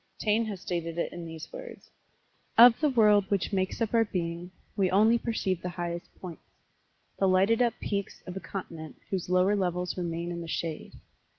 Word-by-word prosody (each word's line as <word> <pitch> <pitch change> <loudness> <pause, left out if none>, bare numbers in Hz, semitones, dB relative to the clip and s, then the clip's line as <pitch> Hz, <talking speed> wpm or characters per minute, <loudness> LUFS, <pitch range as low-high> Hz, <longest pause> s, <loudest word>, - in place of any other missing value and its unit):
Taine 220 +1 +1
has 205 -4 -5
stated 170 -3 -3
it 170 - -2
in 175 -1 -7
these 160 -1 -9
words: - - -10 0.7
"Of 235 0 +9
the 305 - +3
world 210 -5 +5
which 200 0 -1
makes 190 -1 -1
up 225 - -3
our 230 -1 +5
being, 175 -3 -4 0.3
we 195 -3 +2
only 220 +5 +4
perceive 190 -7 -2
the 180 - -3
highest 175 -1 -5
points 175 -3 -8 0.8
the 195 - +3
lighted 195 +5 +3
up 240 -2 +2
peaks 200 -1 -4
of 180 - -7
a - - -3
continent 165 -6 -7 0.2
whose 185 -2 -2
lower 185 +3 +3
levels 180 -2 -1
remain 170 0 -3
in 170 0 -5
the 165 - -7
shade." 165 -1 -4
185 Hz, 185 wpm, -28 LUFS, 175-210 Hz, 0.8 s, Of